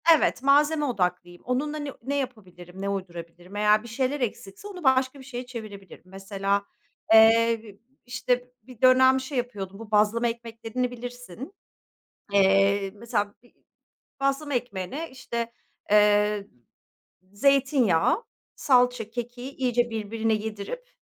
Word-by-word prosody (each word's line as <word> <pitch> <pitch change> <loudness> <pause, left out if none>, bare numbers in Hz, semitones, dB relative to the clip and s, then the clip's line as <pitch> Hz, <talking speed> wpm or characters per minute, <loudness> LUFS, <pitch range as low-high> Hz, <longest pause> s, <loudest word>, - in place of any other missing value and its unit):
Evet, 280 - 0
malzeme 295 +2 +4
odaklıyım. 180 -6 -2
Onunla 290 +5 -1
ne 290 -2 -5
ne 270 +4 -3
yapabilirim, 190 -9 -6
ne 200 - -2
uydurabilirim? 175 -1 -7
Eğer 210 +1 +3
bir 235 - -10
şeyler 260 +4 -1
eksikse, 210 - -5
onu 365 -4 -9
başka 260 0 +2
bir 265 - -11
şeye 250 -2 -6
çevirebilirim. 215 -8 -10
Mesela, 195 +1 -2 0.5
eee, 225 -1 +5 0.3
işte, 245 +1 -1
bir 250 -1 -15
dönem 260 +1 +6
şey 265 +1 -5
yapıyordum. 200 -5 -4
Bu 225 -1 -10
bazlama 215 +3 +3
ekmeklerini 230 +1 -4
bilirsin. 245 - -8 0.8
Eee, 195 0 +4
mesela 205 -2 -2
bir 245 - -24 0.7
bazlama 275 +2 0
ekmeğine 245 - -4
işte, 235 -3 -4 0.4
eee, 210 -1 +4 0.9
zeytinyağı, 270 - +3 0.3
salça, 245 -4 +2
kekiği 245 +2 -6
iyice 245 -2 0
birbirine 225 0 -1
yedirip, 220 - -5
230 Hz, 120 wpm, -26 LUFS, 205-260 Hz, 0.9 s, dönem